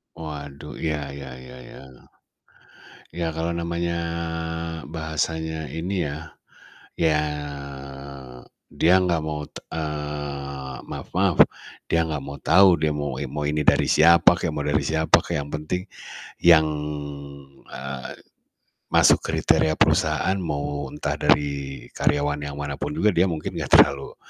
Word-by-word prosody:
Waduh, 75 -2 -8
ya 75 -3 -1
ya 70 -2 -8
ya 65 0 -11
ya. 65 -2 -14 1.0
Ya 85 -2 -3
kalau 85 +1 -1
namanya 85 0 -2 0.9
bahasanya 80 0 -3
ini 85 +3 -2
ya, 75 +3 -7 0.6
ya, 80 -2 +2 1.5
dia 85 +3 +3
gak 85 -2 +1
mau, 75 -1 -3
t - - -9
eee, 75 -3 -5
maaf-maaf, - - +2 0.5
dia 85 0 +2
gak 75 -3 -3
mau 70 +1 -7
tahu, 90 +3 +6
dia 75 -1 0
mau 75 -1 -3
in 75 - -3
mau 75 - -2
ini 75 0 -1
dari - - +4
siapa 85 +2 +6
kek, - - -2
mau - - -2
dari - - +1
siapa 80 0 +4
kek 70 - -1
yang 70 - -9
penting 75 +4 -3 0.6
yang, 80 -2 +7 1.0
eee, 70 -1 -6 0.8
masuk - - +5
kriteria 80 0 +2
perusahaan 95 - +2
mau 75 -3 -3
entah - - -3
dari 70 -2 +1
karyawan 75 0 0
yang 70 - -7
manapun 70 +1 -4
juga 105 +6 +3
dia 90 +2 +3
mungkin 80 -2 -4
gak - - +5
terlalu 70 -1 +4
75 Hz, 130 wpm, -24 LUFS, 70-80 Hz, 1.5 s, yang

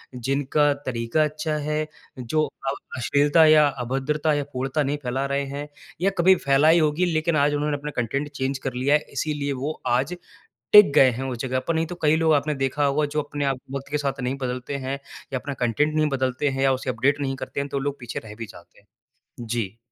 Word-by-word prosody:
जिनका 140 +3 +1
तरीका 120 +4 0
अच्छा 155 +1 -2
है, 150 +1 -2 0.3
जो 155 +6 0 0.3
अब 135 - -2 0.2
अश्लीलता 145 +6 +4
या 155 -1 +7 0.2
अभद्रता 145 +5 0
या 145 -1 0
पूर्णता 135 +4 -1
नहीं 140 +2 -1
फैला 130 +2 -1
रहे 140 0 -1
हैं 140 +2 -6 0.3
या 195 - +3
कभी 185 +2 +6
फैलाई 150 +5 +5
होगी 155 +3 +2
लेकिन 155 +1 +1
आज 145 0 +3
उन्होंने 145 0 0
अपने 150 +1 -6
कंटेन्ट 135 +5 -2
चेंज 135 -1 -2
कर 130 - -2
लिया 135 +4 +2
है - - +4
इसीलिए 145 -2 -2
वो 150 - -1 0.2
आज 130 +7 +1 0.6
टिक 210 -8 +9
गए 130 - +7
हैं 125 +2 -4
उस 120 - -5
जगह 130 +1 -1
पर। 165 - +2
नहीं 160 0 0
तो 175 - -6
कई 150 +1 +4
लोग 160 -1 +3
आपने 150 +1 +1
देखा 145 +2 0
होगा 140 +2 +2
जो 150 +1 -1
अपने 145 0 -4
आप 135 -2 0 0.2
वक़्त 140 0 -6
के 150 - 0
साथ 135 -1 -2
नहीं 125 +2 -1
बदलते 125 +2 -3
हैं 135 +1 -2 0.3
या 130 - 0
अपना 140 +2 -5
कंटेन्ट 125 +5 0
नहीं 155 -1 +2
बदलते 130 +2 0
हैं 135 0 -2
या 135 - +4
उसे 130 0 -2
अपडेट 140 +5 +1
नहीं 135 -1 -2
करते 130 +1 -5
हैं, 140 - -3
तो 140 - -2
लोग 140 +1 -3
पीछे 120 -1 -5
रह 105 -1 -9
भी 115 - -5
जाते 95 -5 -16
हैं। - - -31 0.6
जी। 110 -2 -3
140 Hz, 220 wpm, -24 LUFS, 130-150 Hz, 0.6 s, टिक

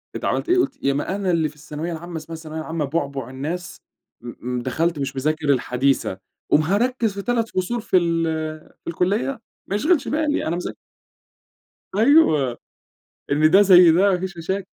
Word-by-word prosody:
أنت - - -4
عملت - - -1
إيه؟ 365 - +4
قُلت 275 -6 -1
يا 140 - +2
ما 145 +7 -2
أنا 195 -2 -1
اللي 160 -3 +1
في 150 - -18
الثانوية 150 +3 -6
العامة 170 +1 -6
اسمها 160 +1 -7
الثانوية 160 0 -7
العامة 160 -1 -3
بُعبع 140 -4 -3
الناس، 155 +7 -6 0.4
م 120 -1 -8 0.2
م - - -2
دخلت 155 +6 -1
مش 135 0 -3
مذاكر 150 +2 -1
الحديثة، 130 -5 +1 0.3
قوم 150 - +5
هاركّز 220 +5 0
في 200 - -5
3 230 0 -1
فصول 220 +6 -2
في 215 - +2
ال 170 -1 +1 0.6
في - - -19
الكلية! 200 +10 -1 0.3
ما 200 - -2
يشغلش 300 - +2
بالي، 300 0 0
أنا 165 - 0
مذا 180 - -4 1.2
أيوه، 200 - +4 0.7
إن 155 +2 +4
ده 195 +3 +7
زي 180 -4 +8
ده، 195 +4 +4
ما 180 - 0
فيش 190 -1 -5
مشاكل، 190 +3 -3
170 Hz, 180 wpm, -22 LUFS, 150-200 Hz, 1.2 s, زي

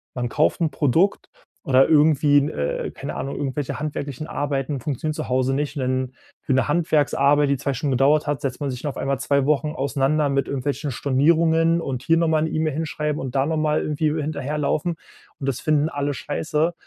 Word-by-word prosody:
Man 120 -1 -2
kauft 155 +7 +1
'n 160 -2 +1
Produkt 160 +7 +1 0.3
oder 135 -4 +4
irgendwie 150 -2 +4
'n, 140 +1 -1
äh, 70 0 -3
keine - - -6
Ahnung, 135 - -4
irgendwelche 140 0 -3
handwerklichen 145 -1 -4
Arbeiten 140 -1 -2
funktionieren 150 +4 -3
zu - - -5
Hause 130 +1 +1
nicht, 145 +2 -2
und - - -2
dann 130 0 -1 0.3
für 135 - -1
'ne 130 - +2
Handwerksarbeit, 145 -2 +2
die 140 - +2
2 140 +2 -2
Stunden 135 +2 -2
gedauert 140 +4 +3
hat, 145 -2 -1
setzt 135 0 -4
man 140 -2 -1
sich 125 +4 -5
auf 135 - -4
einmal 135 -1 -1
2 140 0 +1
Wochen 150 +1 +1
auseinander 140 +2 +1
mit 140 0 0
irgendwelchen 140 +2 -2
Stornierungen 165 +5 +2
und 130 -5 -4
hier 165 - +3
nochmal 160 -2 +2
'ne 160 - -1
E-Mail 155 -1 0
hinschreiben 150 -1 -2
und 130 -1 -6
da 135 0 +2
nochmal 155 -1 +1
irgendwie 150 0 0
hinterherlaufen 150 +2 -2 0.4
und 135 - -5
das 125 - -3
finden 155 0 +2
alle 145 -1 -2
scheiße. 155 +3 -1
145 Hz, 190 wpm, -22 LUFS, 135-155 Hz, 0.4 s, oder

